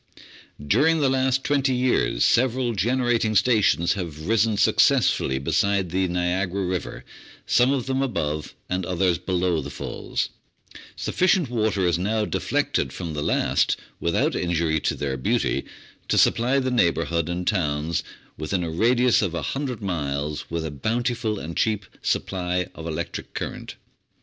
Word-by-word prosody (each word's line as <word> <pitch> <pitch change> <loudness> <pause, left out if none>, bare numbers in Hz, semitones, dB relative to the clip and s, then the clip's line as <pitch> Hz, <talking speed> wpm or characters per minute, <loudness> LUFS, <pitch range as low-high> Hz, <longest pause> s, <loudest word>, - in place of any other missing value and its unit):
During 160 - +3
the 135 -3 +2
last 130 0 +1
twenty 140 -2 +1
years 125 - +2
several 125 0 +2
generating 120 0 +1
stations 100 -5 +3
have 80 -5 -6
risen 110 -1 +2
successfully 65 -8 +3
beside 95 +6 0
the 95 +1 +1
Niagara 90 +2 -1
River, 90 -1 -4 0.4
some 125 +2 +3
of 135 -4 0
them 135 0 0
above 75 - -2
and 90 +1 -2
others 90 -1 +1
below 90 -2 0
the 70 - -7
Falls; 70 - -4 0.7
sufficient 180 -7 +1
water 110 -5 +1
is 85 0 +1
now 105 +3 0
deflected 65 - -1
from 85 +1 -5
the 75 - -3
last - - +1 0.2
without 85 0 +1
injury 85 -2 0
to - - -1
their 70 -2 -3
beauty 65 - 0 0.4
to - - +1
supply 125 +4 +3
the 130 -1 0
neighbourhood 85 -6 +1
and 90 +1 -3
towns 80 -3 0 0.4
within 90 +4 -1
a 80 - -3
radius 120 +7 +3
of 95 -5 -1
100 125 +5 -3
miles 75 -5 -3
with 85 -1 -3
a 80 - -4
bountiful 115 - -1
and 85 -3 -6
cheap 105 -3 0 0.2
supply 90 -1 -1
of 80 - -8
electric 85 +1 -5
current. - - -5
95 Hz, 145 wpm, -24 LUFS, 85-120 Hz, 0.7 s, During